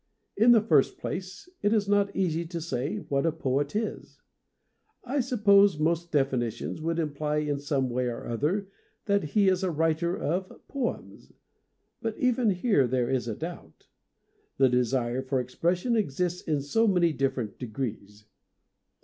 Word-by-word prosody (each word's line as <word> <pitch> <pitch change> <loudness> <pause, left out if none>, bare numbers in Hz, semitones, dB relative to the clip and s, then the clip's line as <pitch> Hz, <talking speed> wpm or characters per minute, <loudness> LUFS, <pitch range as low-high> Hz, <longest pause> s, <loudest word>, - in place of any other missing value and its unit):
In 225 +4 +5
the 225 -3 +6
first 150 -10 +3
place, 185 - -6
it 205 - +2
is 210 -3 +2
not 200 0 +2
easy 170 -3 0
to 170 0 -5
say 140 -2 -3
what 140 -9 -1
a 165 - +2
poet 140 0 -1
is. 220 +1 -4 0.8
I 265 +3 -1
suppose 205 - +4
most 170 +2 0
definitions 135 -1 -1
would 165 +1 -1
imply 150 -1 -1
in 150 -2 -1
some 140 -2 0
way 125 0 -1
or 120 -1 -5
other 155 - -1 0.4
that 200 -1 +2
he 195 +7 +2
was 185 0 +3
a 185 - +1
writer 165 +2 0
of 185 +4 -3
poems. 265 -4 -5 0.7
But 225 -1 -3
even 250 -2 +2
here 185 - +2
there 125 0 0
is 130 -3 0
a 110 - -3
doubt. 170 +6 -9 0.7
The 135 -1 +5
desire 125 0 0
for 130 0 -1
expression 175 - 0
exists 180 -2 -1
in 150 -4 -1
so 225 +11 +2
many 175 -5 +3
differ 135 -2 0
ent 110 - -7
degrees. 110 -4 -6
160 Hz, 160 wpm, -27 LUFS, 135-200 Hz, 0.8 s, the